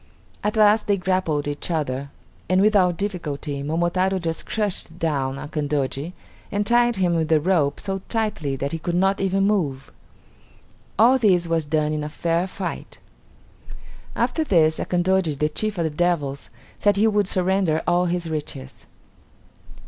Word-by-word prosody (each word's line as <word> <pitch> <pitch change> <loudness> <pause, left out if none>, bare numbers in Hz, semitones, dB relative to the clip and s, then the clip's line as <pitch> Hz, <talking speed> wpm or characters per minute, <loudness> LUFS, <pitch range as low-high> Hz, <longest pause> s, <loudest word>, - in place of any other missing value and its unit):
At 210 +1 -1
last 215 0 +4
they 200 -1 +2
grappled 180 -6 0
each 145 +3 -4
other, 140 -4 -2 0.4
and 185 0 +3
without 195 -4 +3
difficulty 150 -8 -4
Momotaro 175 +5 0
just 165 -2 -4
crushed 200 -6 -2
down 140 -5 -1
Akandoji 145 +1 -3 0.4
and 205 0 0
tied 240 +1 +3
him 180 -3 +1
with 160 -1 0
a 155 - +5
rope 155 -4 +1
so 195 -1 -3
tightly 210 - -1
that 140 +1 -3
he 165 - -3
could 175 +2 -2
not 195 +2 +2
even 195 0 +1
move. 150 -10 -1 1.1
All 245 +5 +5
this 180 -7 +3
was 165 -2 0
done 150 0 0
in 150 -1 -2
a 150 - -4
fair 170 +3 -1
fight. 185 -1 -6 1.2
After 320 - 0
this 160 - +3
Akandoji 180 -3 +1
the 150 +2 +1
chief 210 +6 -3
of 170 - 0
the 160 - -1
devils 150 -4 -1 0.3
said 205 -1 +3
he 205 +2 +3
would 210 -3 +2
surrender 185 -4 +1
all 175 0 +2
his 175 -1 -1
riches. 150 - -6
175 Hz, 155 wpm, -23 LUFS, 150-195 Hz, 1.2 s, a